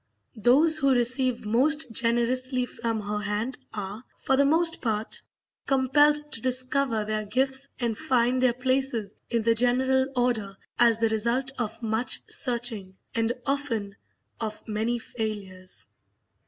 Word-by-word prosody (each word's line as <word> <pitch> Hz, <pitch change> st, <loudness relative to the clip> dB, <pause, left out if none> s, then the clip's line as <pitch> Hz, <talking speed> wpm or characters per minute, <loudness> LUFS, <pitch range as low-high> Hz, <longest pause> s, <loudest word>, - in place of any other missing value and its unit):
Those 305 Hz, +8 st, +4 dB
who 275 Hz, -2 st, +3 dB
receive 250 Hz, 0 st, +1 dB
most 270 Hz, +6 st, +2 dB
generously 250 Hz, +3 st, +1 dB
from 230 Hz, -2 st, -3 dB
her 210 Hz, 0 st, -3 dB
hand 210 Hz, +5 st, -3 dB
are, 205 Hz, +2 st, -6 dB
for 270 Hz, -, +1 dB
the 280 Hz, +1 st, +3 dB
most 330 Hz, +3 st, +3 dB
part, 220 Hz, -2 st, -2 dB, 0.5 s
compelled 295 Hz, +2 st, +3 dB
to 225 Hz, -, -1 dB
discover 255 Hz, -2 st, +1 dB
their 215 Hz, 0 st, -2 dB
gifts 265 Hz, +5 st, +1 dB
and 235 Hz, -3 st, -1 dB
find 250 Hz, +2 st, +1 dB
their 255 Hz, -2 st, +4 dB
places 255 Hz, -5 st, 0 dB, 0.2 s
in 230 Hz, -2 st, 0 dB
the 230 Hz, +1 st, +3 dB
general 260 Hz, +3 st, +2 dB
order 225 Hz, -6 st, -1 dB, 0.2 s
as 235 Hz, -2 st, +5 dB
the 225 Hz, 0 st, +1 dB
result 235 Hz, +5 st, 0 dB
of 225 Hz, 0 st, -4 dB
much 225 Hz, +2 st, +2 dB
searching, 230 Hz, -7 st, -2 dB, 0.2 s
and 230 Hz, 0 st, 0 dB
often 235 Hz, -8 st, -2 dB, 0.4 s
of 215 Hz, -1 st, -6 dB
many 220 Hz, +3 st, -1 dB
failures. 205 Hz, -6 st, -6 dB
240 Hz, 135 wpm, -26 LUFS, 220-260 Hz, 0.5 s, as